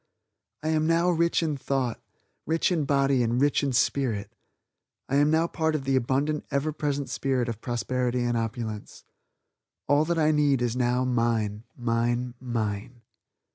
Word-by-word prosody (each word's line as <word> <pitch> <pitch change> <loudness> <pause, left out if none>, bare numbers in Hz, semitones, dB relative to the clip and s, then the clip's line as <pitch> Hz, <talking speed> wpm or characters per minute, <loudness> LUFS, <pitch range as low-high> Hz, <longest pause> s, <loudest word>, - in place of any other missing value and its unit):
"I 155 - -1
am 155 0 +2
now 170 +2 +3
rich 170 0 +2
in 155 -3 -1
thought, 130 -3 -2 0.5
rich 165 +3 +1
in 160 -5 +1
body 140 -2 +2
and 120 +1 +1
rich 145 +1 +3
in 140 -2 0
spirit. 120 -4 0 0.7
I 140 - +1
am 145 +1 +4
now 160 +1 +3
part 160 -2 -1
of 145 - -2
the 135 0 +1
abundant 135 +4 0
ever 145 +2 -1
present 145 -2 -2
spirit 130 -3 -1
of 115 -2 -5
prosperity 125 0 -1
and 120 0 0
opulence. 115 -2 -4 0.8
All 145 +1 +4
that 170 +1 0
I 155 -1 +3
need 145 -3 +3
is 120 -1 -1
now 125 0 +1
mine, 115 -3 0
mine, 120 +1 0
mine." 115 -1 -4
130 Hz, 160 wpm, -26 LUFS, 120-150 Hz, 0.8 s, am